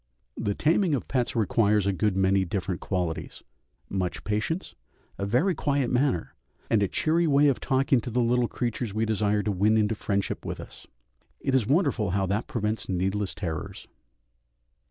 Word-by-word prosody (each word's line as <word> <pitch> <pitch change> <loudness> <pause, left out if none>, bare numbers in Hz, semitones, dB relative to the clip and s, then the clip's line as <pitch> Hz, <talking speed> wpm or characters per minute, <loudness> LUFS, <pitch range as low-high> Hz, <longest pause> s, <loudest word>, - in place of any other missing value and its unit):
The 100 - -2
taming 165 +1 +2
of 130 - -4
pets 125 -3 -1
requires 105 -2 +2
a 100 - +1
good 100 0 0
many 95 0 +3
different 95 -1 -3
qualities 90 -4 -3 0.4
much 95 -2 -3
patience, 110 - -2 0.5
a 100 - -1
very 130 - +2
quiet 140 -4 0
manner, 125 - +1 0.4
and 110 - +4
a 100 - +3
cheery 165 - +1
way 145 0 +5
of 135 - 0
talking 135 -1 +2
to 120 - -5
the 120 +2 0
little 120 0 +2
creatures 120 -3 -3
we 110 +1 +1
desire 105 -1 +1
to 105 - 0
win 105 +3 +3
into 110 0 +2
friendship 100 -2 -2
with - - -5
us; - - -11 0.5
it 135 - -2
is 125 -6 +2
wonderful 140 - +2
how 95 +2 +1
that 100 +5 -1
prevents 110 -2 -2
needless 95 +2 -1
terrors. 80 -6 -5
110 Hz, 170 wpm, -27 LUFS, 100-130 Hz, 0.5 s, way